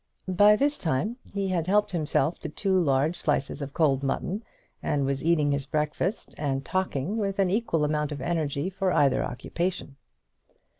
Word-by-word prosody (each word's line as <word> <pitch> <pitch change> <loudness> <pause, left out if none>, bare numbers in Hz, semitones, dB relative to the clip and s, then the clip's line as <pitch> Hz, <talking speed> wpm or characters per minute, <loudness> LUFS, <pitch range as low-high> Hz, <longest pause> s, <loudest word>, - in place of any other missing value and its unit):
By 205 +3 +6
this 285 +5 +1
time 175 - -1
he 200 -1 -2
had 175 -3 0
helped 205 +2 +3
himself 155 -2 0
to 160 - -5
two 190 +5 0
large 145 +2 +1
slices 145 -1 -1
of 140 0 -6
cold 140 -5 +3
mutton, 175 - -2 0.4
and 140 -2 0
was 135 -1 -1
eating 155 -3 +3
his 140 -1 -1
breakfast 150 +7 -2
and 140 -2 -1
talking 185 0 -1
with 200 -2 -1
an 190 -2 +2
equal 190 -8 +1
amount 150 0 -1
of 145 - -4
energy 155 +2 -1
for 190 0 0
either 140 -5 +3
occupation. 170 +2 -3
160 Hz, 165 wpm, -27 LUFS, 140-190 Hz, 0.4 s, By